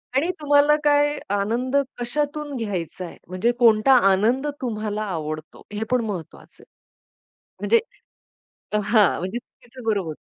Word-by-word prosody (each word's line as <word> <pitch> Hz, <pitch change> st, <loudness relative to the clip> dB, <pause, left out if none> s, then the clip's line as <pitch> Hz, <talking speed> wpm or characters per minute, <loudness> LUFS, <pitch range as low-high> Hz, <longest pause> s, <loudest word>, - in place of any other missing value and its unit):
आणि 295 Hz, +6 st, +2 dB
तुम्हाला 290 Hz, 0 st, +4 dB
काय 290 Hz, 0 st, +3 dB, 0.2 s
आनंद 230 Hz, +6 st, -1 dB, 0.2 s
कशातून 290 Hz, +3 st, -2 dB
घ्यायचाय, 185 Hz, -, -5 dB
म्हणजे 185 Hz, +7 st, 0 dB
कोणता 230 Hz, +2 st, +5 dB, 0.2 s
आनंद 235 Hz, +9 st, +2 dB
तुम्हाला 215 Hz, -3 st, -3 dB
आवडतो, 155 Hz, -5 st, -5 dB
हे 210 Hz, +1 st, -2 dB
पण 250 Hz, -1 st, +3 dB
महत्वाचं 185 Hz, -7 st, -8 dB
आहे. -, -, -25 dB, 0.9 s
म्हणजे 465 Hz, -, +4 dB, 0.9 s
अ 210 Hz, -, +2 dB
हां 210 Hz, -2 st, +5 dB
म्हणजे 190 Hz, +6 st, -3 dB
तुमचं 245 Hz, 0 st, -16 dB
बरोबर. 190 Hz, -7 st, 0 dB
225 Hz, 125 wpm, -23 LUFS, 200-270 Hz, 0.9 s, कोणता